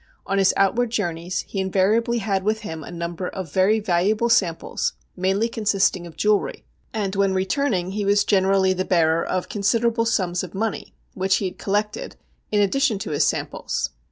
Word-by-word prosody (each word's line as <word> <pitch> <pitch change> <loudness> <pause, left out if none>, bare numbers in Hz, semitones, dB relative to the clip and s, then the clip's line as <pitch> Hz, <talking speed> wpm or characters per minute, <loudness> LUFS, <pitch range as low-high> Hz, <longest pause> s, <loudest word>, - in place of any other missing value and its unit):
On 195 0 0
his 190 -1 +5
outward 230 +5 +2
journeys 175 -5 -2
he 195 - -6
invariably 200 +5 +2
had 195 -3 0
with 215 +2 0
him 160 -7 -6
a - - -9
number 170 +1 -4
of 180 -6 -6
very 195 +4 +3
valuable 210 +4 +1
samples 185 -8 +1 0.2
mainly 195 +4 +1
consisting 200 -5 0
of 165 - -14
jewellery, 210 -1 0 0.3
and 205 -3 -2
when 195 -1 +2
returning 190 -1 0
he 205 +1 -2
was 205 +1 +3
generally 190 -1 +3
the 185 0 -1
bearer 165 -3 +2
of 185 -1 -2
considerable 230 +3 +1
sums 180 -5 0
of 185 0 -8
money, 220 +2 -3 0.2
which 195 0 +1
he 200 - -1
had 185 - -5
collected, 210 +1 -2 0.4
in 210 - +2
addition 230 +3 +2
to 200 -3 -5
his 145 - +2
samples. - - -2
195 Hz, 175 wpm, -23 LUFS, 185-215 Hz, 0.4 s, his